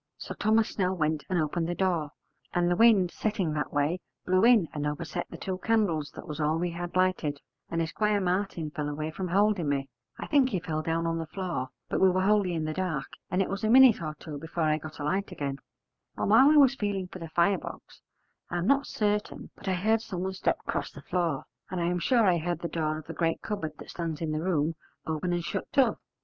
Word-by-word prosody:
So -, -, -6 dB
Thomas 220 Hz, +1 st, +2 dB
Snell 185 Hz, -1 st, 0 dB
went 155 Hz, -3 st, -1 dB
and 185 Hz, -2 st, +1 dB
opened 165 Hz, +2 st, -1 dB
the 175 Hz, -, -1 dB
door, 175 Hz, -6 st, 0 dB, 0.5 s
and 175 Hz, 0 st, +2 dB
the -, -, +3 dB
wind 205 Hz, -5 st, +5 dB
setting 200 Hz, -7 st, -1 dB
that 150 Hz, -2 st, -2 dB
way 145 Hz, +5 st, +1 dB, 0.3 s
blew 185 Hz, +1 st, +3 dB
in 230 Hz, -7 st, +6 dB
and 150 Hz, -1 st, -2 dB
overset 150 Hz, 0 st, -4 dB
the -, -, -8 dB
two 185 Hz, -1 st, -4 dB
candles 195 Hz, -11 st, +1 dB
that -, -, -9 dB
was 150 Hz, 0 st, -6 dB
all 155 Hz, +1 st, +1 dB
we 175 Hz, +1 st, -1 dB
had 175 Hz, +1 st, -6 dB
lighted: 185 Hz, -6 st, +1 dB, 0.3 s
and 165 Hz, 0 st, 0 dB
Esquire 210 Hz, +6 st, +1 dB
Martin 180 Hz, -4 st, -1 dB
fell 150 Hz, -1 st, -3 dB
away 155 Hz, +2 st, -3 dB
from 185 Hz, +4 st, -4 dB
holding 195 Hz, -3 st, +2 dB
me; 135 Hz, -1 st, -1 dB, 0.3 s
I -, -, -5 dB
think 280 Hz, -4 st, +3 dB
he 195 Hz, -7 st, -1 dB
fell 155 Hz, -1 st, -3 dB
down 165 Hz, +1 st, -1 dB
on 165 Hz, 0 st, 0 dB
the 165 Hz, -, -4 dB
floor, 175 Hz, -7 st, -3 dB, 0.2 s
but -, -, -1 dB
we 190 Hz, -, +7 dB
were 185 Hz, +1 st, +1 dB
wholly 200 Hz, -3 st, +3 dB
in 160 Hz, -1 st, -1 dB
the 155 Hz, -, -2 dB
dark, 180 Hz, -2 st, -2 dB, 0.2 s
and 185 Hz, +2 st, +2 dB
it -, -, -4 dB
was 195 Hz, +1 st, -4 dB
a 215 Hz, -, +2 dB
minute 255 Hz, -3 st, +7 dB
or 155 Hz, -2 st, -4 dB
two 150 Hz, -2 st, -7 dB
before 165 Hz, +2 st, -3 dB
I 155 Hz, 0 st, +2 dB
got 155 Hz, +1 st, -9 dB
a 145 Hz, -, -5 dB
light 190 Hz, +7 st, -1 dB
again: 140 Hz, -1 st, -4 dB, 0.6 s
and -, -, 0 dB
while 260 Hz, +6 st, +8 dB
I 305 Hz, -, +5 dB
was 275 Hz, -3 st, +7 dB
feeling 205 Hz, -6 st, -2 dB
for 185 Hz, -, -10 dB
the 165 Hz, -2 st, -7 dB
fire 170 Hz, +3 st, +3 dB
box, -, -, -10 dB, 0.5 s
I 175 Hz, -, -2 dB
am 175 Hz, -, -1 dB
not 280 Hz, +4 st, +3 dB
certain 210 Hz, -1 st, -2 dB
but -, -, -12 dB
I 190 Hz, -, +2 dB
heard 220 Hz, +5 st, +2 dB
someone 190 Hz, -3 st, -4 dB
step 190 Hz, -, 0 dB
'cross -, -, -2 dB
the -, -, -12 dB
floor, 170 Hz, -6 st, -1 dB, 0.2 s
and 185 Hz, -, -3 dB
I 170 Hz, -, 0 dB
am 175 Hz, +1 st, 0 dB
sure 230 Hz, +6 st, +3 dB
I 180 Hz, -3 st, +4 dB
heard 175 Hz, +2 st, -2 dB
the 170 Hz, -, -2 dB
door 155 Hz, -2 st, -1 dB
of 155 Hz, -, -9 dB
the -, -, -7 dB
great 165 Hz, -1 st, -1 dB
cupboard 200 Hz, -8 st, -3 dB
that -, -, -10 dB
stands 165 Hz, -3 st, -4 dB
in 160 Hz, -2 st, -2 dB
the 155 Hz, 0 st, -1 dB
room 165 Hz, -3 st, +1 dB, 0.3 s
open 160 Hz, +3 st, -2 dB
and 175 Hz, -1 st, -1 dB
shut 190 Hz, -, -4 dB
to. 270 Hz, -2 st, +3 dB
175 Hz, 240 wpm, -28 LUFS, 155-195 Hz, 0.6 s, while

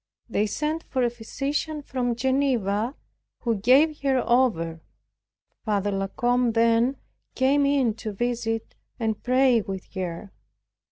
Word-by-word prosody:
They 215 Hz, -2 st, 0 dB
sent 305 Hz, +8 st, -2 dB
for 260 Hz, -2 st, -1 dB
a 240 Hz, -, +1 dB
physician 285 Hz, +6 st, -3 dB
from 245 Hz, -3 st, -1 dB
Geneva, 250 Hz, -3 st, 0 dB, 0.5 s
who 235 Hz, -, +1 dB
gave 275 Hz, +9 st, +4 dB
her 270 Hz, -2 st, +1 dB
over. 165 Hz, -10 st, +1 dB, 0.8 s
Father 205 Hz, -2 st, 0 dB
La 195 Hz, 0 st, -1 dB
Combe 245 Hz, +3 st, +1 dB
then 230 Hz, +3 st, +3 dB, 0.4 s
came 275 Hz, +2 st, +3 dB
in 270 Hz, -5 st, +2 dB
to 220 Hz, -2 st, -5 dB
visit, 225 Hz, +1 st, -2 dB, 0.3 s
and 220 Hz, -2 st, -1 dB
pray 255 Hz, -1 st, +3 dB
with 195 Hz, -2 st, -7 dB
her. 185 Hz, +1 st, -5 dB
240 Hz, 125 wpm, -25 LUFS, 215-265 Hz, 0.8 s, gave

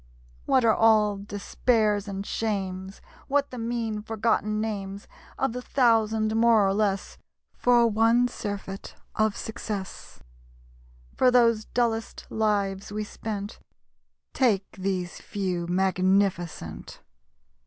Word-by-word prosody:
What 255 Hz, -3 st, +4 dB
are 220 Hz, -, +5 dB
all 215 Hz, -2 st, +4 dB
despairs 205 Hz, +1 st, 0 dB
and 195 Hz, 0 st, -5 dB
shames, 190 Hz, -4 st, -3 dB, 0.3 s
What 285 Hz, 0 st, +1 dB
the 250 Hz, -, -6 dB
mean, 230 Hz, -2 st, -2 dB
forgotten 215 Hz, -1 st, 0 dB
names 200 Hz, -2 st, -4 dB, 0.3 s
Of 265 Hz, -3 st, 0 dB
the 250 Hz, -, -4 dB
thousand 220 Hz, -4 st, +2 dB
more 225 Hz, -2 st, +5 dB
or 195 Hz, -, +2 dB
less, 200 Hz, -2 st, -1 dB, 0.3 s
For 240 Hz, -1 st, +4 dB
one 230 Hz, +2 st, +3 dB
surfeit 200 Hz, -4 st, -6 dB, 0.2 s
of 215 Hz, -1 st, +1 dB
success? 210 Hz, -3 st, -6 dB, 1.0 s
For 255 Hz, -, +4 dB
those 230 Hz, -3 st, +4 dB
dullest 230 Hz, -2 st, -2 dB
lives 200 Hz, -3 st, 0 dB
we 210 Hz, +1 st, -2 dB
spent, 210 Hz, -1 st, -6 dB, 0.7 s
Take 210 Hz, -7 st, +1 dB
these 185 Hz, -2 st, -3 dB
Few 180 Hz, -4 st, -3 dB
magnificent! 185 Hz, -, 0 dB
215 Hz, 110 wpm, -26 LUFS, 195-225 Hz, 1.0 s, are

